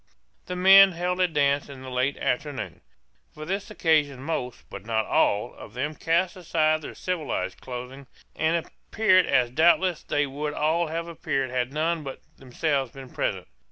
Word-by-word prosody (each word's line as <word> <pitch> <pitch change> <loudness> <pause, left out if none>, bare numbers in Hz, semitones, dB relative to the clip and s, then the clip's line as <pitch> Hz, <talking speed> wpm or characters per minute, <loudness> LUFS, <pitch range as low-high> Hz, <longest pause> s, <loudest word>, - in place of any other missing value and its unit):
The 180 - -4
men 190 +1 +8
held 180 +2 -2
a 180 - +4
dance 145 -3 +1
in 135 -2 -10
the 130 - -8
late 130 +2 0
afternoon. 140 +2 -3 0.5
For 155 0 -7
this 195 +5 -3
occasion 150 -9 +1
most, 135 -6 -4
but 95 - -9
not 110 0 0
all, 105 +4 +1
of 110 - -13
them 145 +5 -2
cast 170 +4 0
aside 155 -3 +1
their - - -8
civilized 180 -5 -3
clothing, 125 +2 -8 0.3
and 160 +1 0
appeared 185 -4 +2
as 125 -2 +2
doubtless 170 +4 +3
they 145 0 0
would 145 +2 -4
all 160 +3 +1
have 165 +2 -4
appeared 135 -6 -2
had 125 0 -1
none 160 +2 0
but 135 -2 -7 0.2
themselves 135 0 -2
been 135 -2 -11
present. - - -2
150 Hz, 165 wpm, -25 LUFS, 130-170 Hz, 0.5 s, men